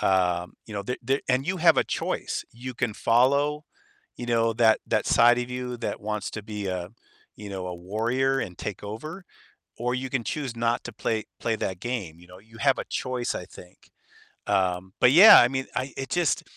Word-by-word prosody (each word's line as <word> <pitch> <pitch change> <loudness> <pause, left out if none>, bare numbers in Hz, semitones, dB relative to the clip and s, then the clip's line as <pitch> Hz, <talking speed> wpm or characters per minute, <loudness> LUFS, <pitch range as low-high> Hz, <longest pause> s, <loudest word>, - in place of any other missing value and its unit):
um, 90 -2 +1
you 110 - -9
know, 100 - -3
th 125 +5 -4
there 135 +4 0
and 130 +3 +1
you 185 +1 0
have 165 -1 +5
a - - +3
choice. - - -3
You 125 +2 -7
can 115 -2 -1
follow, 140 +7 +2 0.5
you 120 - -6
know, 115 -1 +2
that 110 -1 +4
that - - 0
side 120 +1 +5
of 125 - -3
you 125 -1 -4
that 115 - -4
wants 105 0 -3
to 105 - -6
be 105 -1 -5
a 90 -1 -4 0.5
you 105 - -9
know, 95 -2 -5
a 90 - -5
warrior 120 +9 0
and 90 - -6
take 105 -1 -6
over, 155 - -7 0.5
or 125 +1 -1
you 130 0 -4
can 135 -3 -1
choose 140 -6 -3
not 115 +1 0
to 120 - -7
play 110 0 -2 0.2
play 115 -1 0
that 95 -3 -4
game, 100 -9 -4
you 85 - -16
know? 90 0 -14
You 110 +2 -17
have 135 0 +2
a - - -3
choice, 125 -1 -3
I 90 - -5
think. 90 0 -16 0.6
Um, 95 -1 0
but 125 - +6
yeah, 185 +10 +10
I 120 - +5
mean, 130 +1 -3
I 130 +1 -3
it 135 0 -5
just 175 -4 +1
115 Hz, 210 wpm, -26 LUFS, 100-130 Hz, 0.6 s, yeah